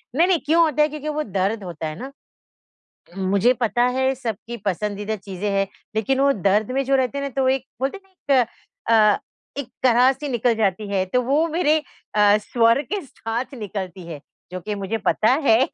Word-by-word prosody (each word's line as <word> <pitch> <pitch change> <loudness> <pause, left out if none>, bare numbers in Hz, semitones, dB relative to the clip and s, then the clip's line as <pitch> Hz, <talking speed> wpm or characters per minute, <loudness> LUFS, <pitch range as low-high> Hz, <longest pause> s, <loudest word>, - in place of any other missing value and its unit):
नहीं, 335 +4 +4
नहीं 365 -4 +3
क्यों 330 +3 +4
होता 305 -2 +1
है, 300 - +3
क्योंकि 305 0 -5
वो 305 0 -1
दर्द 200 +2 -1
होता 165 -3 -5
है 155 - -5
ना। 265 +2 -7 1.1
उम, 190 - -2
मुझे 200 +6 +4
पता 240 0 0
है 265 0 +2
सबकी 235 -1 -5
पसंदीदा 205 +2 -2
चीज़ें 195 0 -5
है, 195 0 +1 0.3
लेकिन 260 +5 +1
वो 280 0 +5
दर्द 205 +2 +1
में 270 +1 0
जो 275 +1 +2
रहते 260 +1 0
हैं 280 - -2
ना 280 - -3
तो 260 - +2
एक 265 -1 0 0.2
बोलते 275 +8 -1
हैं 385 -1 -25 0.2
ना - - +6
एक 235 - -1 0.7
अ, - - -24 0.4
एक 255 - -11 0.2
कराह-सी 260 +3 +3
निकल 240 -1 +1
जाती 210 -1 0
है, 190 -1 +1
तो 250 +7 +1
वो 295 +6 +2
मेरे 315 -1 +2 0.4
अ, 210 0 +5
स्वर 230 +4 +2
के 400 +7 -3
साथ 240 0 -5
निकलती 190 -3 -6
है, 155 -4 -7 0.3
जो 185 - -4
कि 210 +3 -4
मुझे 200 +3 -3
पता 220 +3 +3
है 225 -2 +5
235 Hz, 200 wpm, -22 LUFS, 205-275 Hz, 1.1 s, ना